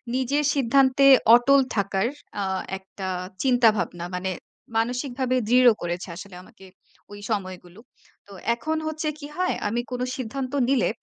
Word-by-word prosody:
নিজের 275 +3 0
সিদ্ধান্তে 275 +1 +3 0.3
অটল 275 +3 +5 0.2
থাকার 195 +1 0 0.3
আ - - 0 0.3
একটা 190 0 -9 0.4
চিন্তাভাবনা। 225 -9 +2
মানে 185 +1 -2 0.5
মানসিকভাবে 250 +2 -1
দৃঢ় 250 +1 +6
করেছে 175 +2 -4
আসলে 190 0 -10
আমাকে, 190 - -17 0.5
ওই 205 - -9
সময়গুলো। 185 -2 -5 0.5
তো - - -16 0.2
এখন 315 +5 -3
হচ্ছে 310 0 -3
কি 290 - -8
হয়, 365 0 0
আমি 235 +3 -1
কোন 250 0 -3 0.2
সিদ্ধান্ত 255 +2 -5 0.2
নিলে 275 -3 +2
240 Hz, 130 wpm, -24 LUFS, 195-270 Hz, 0.5 s, দৃঢ়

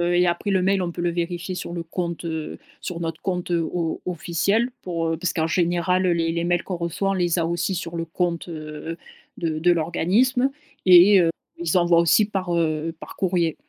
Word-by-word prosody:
et 180 0 +4
après, 175 +4 -1
le 190 -2 +2
mail, 195 0 +2
on 175 - -2
peut 175 - -5
le 175 - +1
vérifier 175 +1 -3
sur 180 - -5
le 170 -1 -4
compte, 170 0 -4
heu, 160 -2 -4 0.2
sur 175 -2 -5
notre 165 -1 -4
compte, 180 -2 -2
heu, 170 -1 +2
o 165 0 -2
officiel, 190 +7 0
pour, 165 -2 -2
heu 165 - -1
parce 180 0 -1
qu'en 160 -1 0
général 175 +2 +1
les 165 -1 +1
les 170 0 -1
mails 175 0 +1
qu'on 185 - -4
reçoit, 170 +3 -2
on - - +2
les 175 -2 +1
a 165 - +1
aussi 170 +3 -1
sur 170 -1 -5
le 165 - -2
compte, 170 +1 -2
heu, 155 +1 -6 0.4
de 160 -2 -2
de 175 +2 +4
l'organisme. 200 - +2 0.4
Et 185 +2 +8
heu, 165 - +3 0.3
ils 170 +1 +1
envoient 170 -1 +4
aussi 170 +5 +4
par, 185 -4 -2
heu, 160 0 -1
par - - -10
courrier. 175 -4 0
175 Hz, 210 wpm, -23 LUFS, 165-180 Hz, 0.4 s, Et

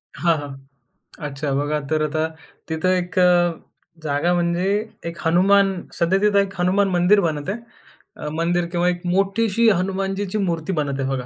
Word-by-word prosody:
हां, 165 +3 +2
हां. 145 -1 -7 0.7
अच्छा 140 0 -4
बघा 145 +2 0
तर 155 -1 +1
आता 155 +1 0 0.4
तिथं 160 +3 0
एक 180 +2 -5
अ, 175 -1 +4 0.5
जागा 150 +4 +1
म्हणजे 175 +1 0 0.4
एक 170 0 -5
हनुमान 195 +3 +4 0.2
सध्या 180 +3 +1
तिथं 210 -1 +3
एक 200 0 0
हनुमान 195 +3 +2
मंदिर 180 +3 +4
बनत 155 -1 -2
आहे. 215 +4 -3 0.6
अ, 150 - -5
मंदिर 170 +2 0
किंवा 175 0 +1
एक 175 0 -3
मोठीशी 200 +5 +2
हनुमानजीची 195 +1 -1
मूर्ती 175 -2 -1
बनत 140 -3 -2
आहे 135 - -1
बघा. 130 -2 -2
175 Hz, 160 wpm, -21 LUFS, 155-195 Hz, 0.7 s, अ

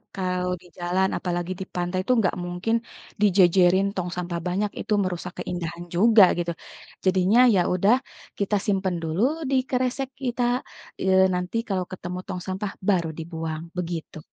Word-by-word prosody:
kalau 180 -1 -1
di - - -19
jalan, 180 +2 +1
apalagi 175 0 -2
di 190 - -4
pantai 180 +1 -1
itu 255 - +2
nggak 195 -5 +1
mungkin 180 +6 -1 0.5
dijejerin 185 -1 +5
tong 180 -1 -2
sampah 175 -1 -3
banyak, 200 +4 0
itu 215 - -1
merusak 180 -1 -4
keindahan 175 -1 -4
juga 215 +3 +7
gitu. 175 0 -1 0.5
Jadinya, 190 +4 +4 0.2
ya - - +4
udah 195 +6 +4 0.4
kita 205 +1 +1
simpan 190 -3 0
dulu 160 +4 -1 0.3
di 270 - +2 0.2
kresek 255 +1 0
kita, 245 -1 -1 0.6
eee, 190 0 +4
nanti 180 +5 -2
kalau 185 -2 0
ketemu 180 -1 -5
tong 180 - -4
sampah, 190 +2 -3 0.2
baru 175 -5 +2
dibuang, 160 -1 -4 0.2
begitu. 170 -3 -4
185 Hz, 150 wpm, -25 LUFS, 175-195 Hz, 0.6 s, juga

